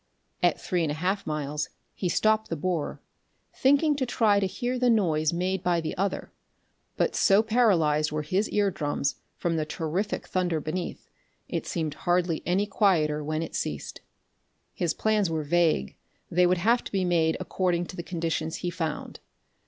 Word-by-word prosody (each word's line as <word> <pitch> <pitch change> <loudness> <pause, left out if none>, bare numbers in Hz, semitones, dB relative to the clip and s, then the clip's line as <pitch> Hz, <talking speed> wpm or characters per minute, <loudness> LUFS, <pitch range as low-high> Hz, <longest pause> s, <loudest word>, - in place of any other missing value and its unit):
At - - +3
three 180 -3 -1
and 160 - 0
a - - -2
half 185 +4 -1
miles 150 -1 -2 0.2
he 180 - -2
stopped 215 +3 +2
the 165 - -1
borer, 165 -1 -2 0.5
thinking 285 +3 +3
to 265 - 0
try 220 -4 +3
to 195 - +1
hear 245 +6 -2
the 250 0 +3
noise 160 -9 +2
made 180 +2 -1
by 175 -2 +1
the 160 - -3
other, 195 +2 -2 0.7
but - - +1
so 200 +2 +5
paralyzed 170 -11 +3
were 155 0 -2
his 185 +8 0
ear 205 -1 +2
drums 145 -3 -1 0.2
from 170 -1 -1
the 155 - +1
terrific 165 +6 -2
thunder 180 -3 0
beneath, 170 +4 -4 0.4
it - - -3
seemed 160 -3 -2
hardly 175 +1 0
any 190 +3 +2
quieter 165 -8 +2
when 155 +2 -2
it 165 - -7
ceased. - - -4 0.7
His 170 -3 -1
plans 215 -4 +1
were 160 -1 -1
vague; 160 - +1 0.4
they 180 +1 +4
would 180 +1 +3
have 230 +7 +2
to - - -7
be 190 -2 0
made 165 -2 +2
according 180 -1 0
to 185 - -9
the 175 - -4
conditions 165 -2 -2
he 175 - -3
found. 160 -3 -4
175 Hz, 175 wpm, -27 LUFS, 160-200 Hz, 0.7 s, so